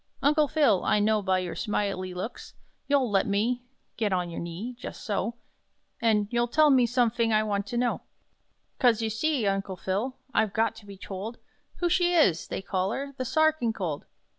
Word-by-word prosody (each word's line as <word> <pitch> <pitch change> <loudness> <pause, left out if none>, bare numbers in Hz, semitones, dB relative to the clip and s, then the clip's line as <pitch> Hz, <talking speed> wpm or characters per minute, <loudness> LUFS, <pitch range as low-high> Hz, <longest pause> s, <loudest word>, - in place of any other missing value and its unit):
"Uncle 300 +1 +4
Phil, 290 - +3
I - - +3
know 215 +1 +2
by 190 -1 +1
your 180 -1 -3
smile 205 -3 -1
y 185 - -4
looks 185 +6 -7 0.3
You'll 275 -5 +2
let 195 -1 +2
me 225 +5 +1 0.4
get 215 -3 0
on 180 -2 -1
your - - -5
knee 175 +9 -5
jus' - - -7
so 220 +1 -2 0.7
An' 215 -3 +2
you'll 240 0 +1
tell 305 +4 +4
me 255 -3 +5
somefing 235 -2 +1
I 215 0 +3
want 200 -1 -1
to 240 - -3
know: 245 0 0 0.8
'Cos, 230 -3 +4
you 220 - -1
see, 265 +1 0
Uncle 195 -1 -1
Phil, 205 +9 -2 0.2
I've 215 -2 +2
got 225 0 +1
to 210 -2 -14
be 200 -1 -10
told 200 +5 -6 0.4
Who 350 - +3
she 350 +1 +2
is 190 - +3
they - - -4
call 190 -1 -1
her 280 +1 -4
'The 255 - -3
Sa 315 +6 +1
archinkold.'" 220 - -3
220 Hz, 190 wpm, -27 LUFS, 195-250 Hz, 0.8 s, me